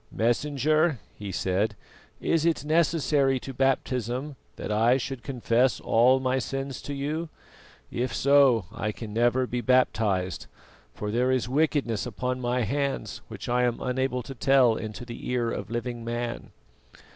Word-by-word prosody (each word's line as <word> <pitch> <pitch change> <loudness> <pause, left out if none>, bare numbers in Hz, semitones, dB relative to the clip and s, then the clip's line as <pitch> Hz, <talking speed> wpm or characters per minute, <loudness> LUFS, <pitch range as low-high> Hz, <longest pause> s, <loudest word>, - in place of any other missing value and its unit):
"Messenger," 145 +6 +1 0.2
he 100 -2 -7
said, 100 +4 0 0.4
"is 165 -2 +1
it 165 -3 +1
necessary 150 -4 +2
to 135 - -7
baptism 130 +1 -1 0.2
that - - -5
I 115 +4 +4
should 135 -1 -5
confess 125 -1 +1
all 125 +3 +4
my 130 0 0
sins 135 +1 -4
to 145 - -5
you? 155 +4 -3 0.6
If 125 +2 -2
so, 135 -7 +4
I 110 -1 -2
can 105 0 -8
never 120 +3 +2
be 125 0 -3
baptised, 105 -7 +1 0.4
for 105 0 -5
there 125 +3 +1
is 130 -3 +1
wickedness 135 -5 0
upon 125 +2 -3
my 125 +1 0
hands 140 +5 -2
which - - -8
I 125 +1 +2
am 120 -1 +1
unable 125 0 -1
to 135 - -7
tell 130 -2 +4
into 110 +2 -6
the 120 -1 -7
ear 120 -2 0
of - - -5
living 120 0 -4
man." 120 0 -4
125 Hz, 150 wpm, -27 LUFS, 115-135 Hz, 0.6 s, I